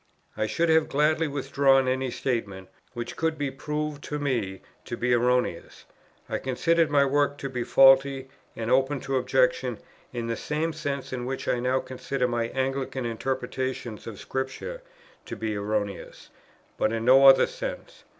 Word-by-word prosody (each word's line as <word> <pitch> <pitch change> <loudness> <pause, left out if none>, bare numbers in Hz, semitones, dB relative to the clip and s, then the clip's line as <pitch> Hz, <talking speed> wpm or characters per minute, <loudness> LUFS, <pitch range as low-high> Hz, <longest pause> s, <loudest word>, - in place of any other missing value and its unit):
I 110 - -1
should 165 +9 0
have 160 -1 +4
gladly 155 +3 +2
withdrawn 135 -1 +2
any 130 0 0
statement, 105 -7 -3 0.2
which 120 0 -5
could 160 -1 -1
be 145 -2 -2
proved 150 +1 -4
to 150 - -3
me 120 -10 -2 0.2
to 120 - -5
be 125 0 +1
erroneous; 125 +1 0 0.4
I - - -2
considered 165 +5 +1
my 140 -1 +4
work 145 +1 +1
to 140 - -5
be 125 -2 -3
faulty 135 +1 +5 0.3
and 115 +1 -3
open 135 +2 +2
to 135 0 -1
objection 125 -1 +1 0.3
in 120 -2 -4
the 115 0 -2
same 155 +5 -2
sense 140 -3 -4
in 125 -1 -4
which 135 0 -4
I 120 - +1
now 130 +2 +1
consider 130 0 -2
my 120 -1 -1
Anglican 130 0 -2
interpretations 125 -1 -3
of 110 -3 -7
Scripture 130 - -5 0.5
to - - -5
be 110 -1 -3
erroneous; 100 -1 -4 0.5
but 110 - +2
in 115 0 -2
no 135 +2 +7
other 135 - +8
sense. - - -7
130 Hz, 160 wpm, -26 LUFS, 120-140 Hz, 0.5 s, other